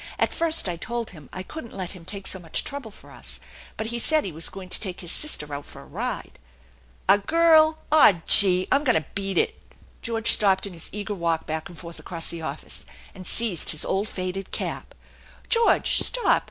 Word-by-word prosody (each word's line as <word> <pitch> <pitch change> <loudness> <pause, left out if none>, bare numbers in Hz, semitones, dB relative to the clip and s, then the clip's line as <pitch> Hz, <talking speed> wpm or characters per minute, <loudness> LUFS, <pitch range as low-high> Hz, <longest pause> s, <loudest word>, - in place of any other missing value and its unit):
"At - - 0
first 330 -7 +1
I 175 -2 -3
told 235 +5 -5
him 155 -7 -14
I 185 - -5
couldn't 235 0 -9
let 185 -2 -4
him 180 -4 -11
take 195 +1 -5
so 190 - -1
much 165 -3 -1
trouble 280 -5 -5
for 205 - -17
us, - - -8 0.4
but 220 - -3
he 235 - -2
said 310 +5 +3
he 190 - -4
was 160 +1 0
going 190 -1 -9
to - - +3
take 185 -4 -2
his 175 -2 -2
sister 150 - 0
out 140 0 -5
for - - -12
a - - -17
ride - - -5 0.4
" 60 0 -32
"A 195 +2 +6
girl! 315 +5 +4
Aw, 205 - +6
gee! 185 -2 +6
I'm 280 +2 +3
going 250 - +3
to 155 - -13
beat 195 -2 -3
it! - - 0 0.2
" - - -28
George 230 -1 +2
stopped 195 -2 +3
in 200 - -8
his 165 - -9
eager 205 0 -5
walk 170 -4 -1
back 160 +1 -4
and 175 - -13
forth 170 0 -10
across 165 -2 -3
the 170 - -7
office, 160 - -7 0.3
and 185 -2 -11
seized 225 -8 0
his 155 - +1
old 200 +3 -1
faded 185 +1 -5
cap. - - -5 0.3
" - - -25
George, 460 -1 +3
stop - - +3
195 Hz, 220 wpm, -24 LUFS, 170-235 Hz, 0.4 s, A